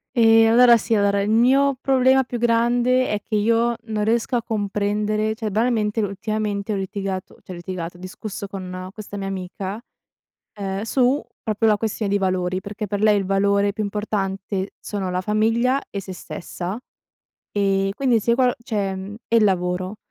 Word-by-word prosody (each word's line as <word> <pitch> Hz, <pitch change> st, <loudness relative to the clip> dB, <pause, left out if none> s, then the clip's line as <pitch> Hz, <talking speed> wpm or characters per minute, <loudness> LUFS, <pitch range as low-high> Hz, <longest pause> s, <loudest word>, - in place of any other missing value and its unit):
Ehm, 225 Hz, -1 st, +6 dB
allora 240 Hz, +1 st, +7 dB
sì 225 Hz, +1 st, 0 dB
allora 200 Hz, -1 st, +2 dB
il 200 Hz, -, -1 dB
mio 265 Hz, +5 st, +4 dB
problema 265 Hz, 0 st, +4 dB
più 245 Hz, -1 st, -5 dB
grande 240 Hz, +2 st, +2 dB
è 210 Hz, 0 st, -1 dB
che 220 Hz, -, -3 dB
io 230 Hz, +3 st, +2 dB
non 215 Hz, -2 st, -2 dB
riesco 230 Hz, +3 st, +1 dB
a 240 Hz, -, +2 dB
comprendere 210 Hz, 0 st, -1 dB
cioè 220 Hz, -2 st, -4 dB
banalmente 220 Hz, 0 st, +1 dB
ultimamente 210 Hz, 0 st, -2 dB
ho -, -, -1 dB
litigato 195 Hz, -1 st, -4 dB
cioè -, -, -10 dB
ho -, -, -7 dB
litigato, 175 Hz, -1 st, -6 dB
ho -, -, -17 dB
discusso 195 Hz, +2 st, -7 dB
con 185 Hz, -1 st, -6 dB
questa 205 Hz, 0 st, -8 dB
mia 195 Hz, -1 st, -4 dB
amica, 190 Hz, +2 st, -5 dB, 0.8 s
uhm, 195 Hz, 0 st, -3 dB
su 255 Hz, +4 st, +2 dB, 0.2 s
proprio 220 Hz, +1 st, +1 dB
la 210 Hz, -, +4 dB
questione 215 Hz, -1 st, -2 dB
di 205 Hz, -, +2 dB
valori, 185 Hz, -1 st, 0 dB
perché 205 Hz, +1 st, -5 dB
per 205 Hz, 0 st, -2 dB
lei 210 Hz, -1 st, +5 dB
il 195 Hz, -, -2 dB
valore 200 Hz, +1 st, +2 dB
più 215 Hz, +1 st, -3 dB
importante 195 Hz, -2 st, -3 dB
sono 195 Hz, -3 st, -4 dB
la 180 Hz, -, 0 dB
famiglia 225 Hz, +6 st, +1 dB
e 200 Hz, -, -4 dB
sé 190 Hz, 0 st, -8 dB
stessa. 180 Hz, +1 st, -6 dB, 0.8 s
Ehm, 195 Hz, -1 st, +1 dB
quindi 245 Hz, +1 st, +2 dB
se 235 Hz, +2 st, +2 dB
qual 250 Hz, 0 st, +2 dB
cioè 200 Hz, -5 st, -2 dB
mhmm, 190 Hz, +2 st, -7 dB
e 230 Hz, -, +1 dB
il 225 Hz, -, +5 dB
lavoro. 185 Hz, 0 st, 0 dB
210 Hz, 175 wpm, -22 LUFS, 195-225 Hz, 0.8 s, allora